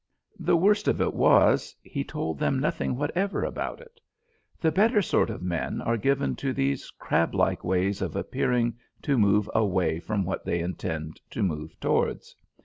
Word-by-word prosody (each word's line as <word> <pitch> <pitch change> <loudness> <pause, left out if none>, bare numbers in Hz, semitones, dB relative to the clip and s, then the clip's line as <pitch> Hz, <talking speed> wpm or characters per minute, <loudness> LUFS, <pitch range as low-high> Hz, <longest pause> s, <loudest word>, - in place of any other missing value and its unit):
The 170 - +3
worst 205 +4 +3
of - - +2
it - - +1
was, - - +4
he - - -4
told 80 -3 -4
them 135 - +1
nothing 130 -2 -1
whatever 175 +9 -1
about - - -3
it. 480 -1 -18 0.6
The 160 - +2
better 210 +6 +4
sort 185 - +2
of 110 - -6
men 85 -2 -2
are 115 - 0
given 135 +4 +1
to 135 -1 -2
these 70 - -1
crablike 85 - +1
ways 95 +2 0
of - - -3
appearing 120 -1 0 0.2
to 145 - +1
move 105 0 +3
away 95 -6 +1
from 100 +1 -2
what 95 - -3
they 85 - -1
intend 80 -3 -4
to - - -2
move 75 -4 -3
towards. - - -1
110 Hz, 165 wpm, -27 LUFS, 90-145 Hz, 0.6 s, was